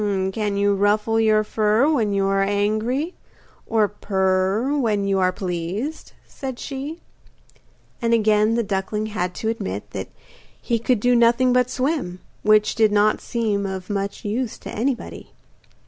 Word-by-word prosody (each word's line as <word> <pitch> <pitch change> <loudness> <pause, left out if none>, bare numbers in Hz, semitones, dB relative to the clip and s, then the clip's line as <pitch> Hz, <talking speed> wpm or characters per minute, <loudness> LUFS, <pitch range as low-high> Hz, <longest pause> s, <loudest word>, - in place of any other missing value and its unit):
'Can 205 -1 -1
you 200 0 +3
ruffle 210 +3 +2
your 215 -1 +3
fur 215 +4 +2
when 240 -10 +1
you 195 -1 +1
are 195 0 +2
angry, 215 - 0 0.5
or 220 -2 +2
purr 195 +5 0
when 215 -7 +1
you 195 -1 +1
are 185 -1 +3
pleased?' 185 - -4
said 265 -3 -6
she. 285 +6 -6 1.0
And 230 0 +1
again 215 -1 +3
the 235 - +1
duckling 205 +1 -2
had 180 -3 -2
to 220 - -2
admit 105 - -4
that 95 -1 -5 0.5
he 235 -1 -1
could 235 -1 +1
do 245 +1 +3
nothing 240 +2 +4
but 250 0 +3
swim, 255 - -2 0.2
which 215 0 +4
did 220 -2 +3
not 210 +1 +3
seem 210 -4 -1
of 190 0 -5
much 200 0 -3
use 225 +3 -2
to - - -9
anybody. 245 +3 -3
215 Hz, 150 wpm, -22 LUFS, 200-235 Hz, 1.0 s, nothing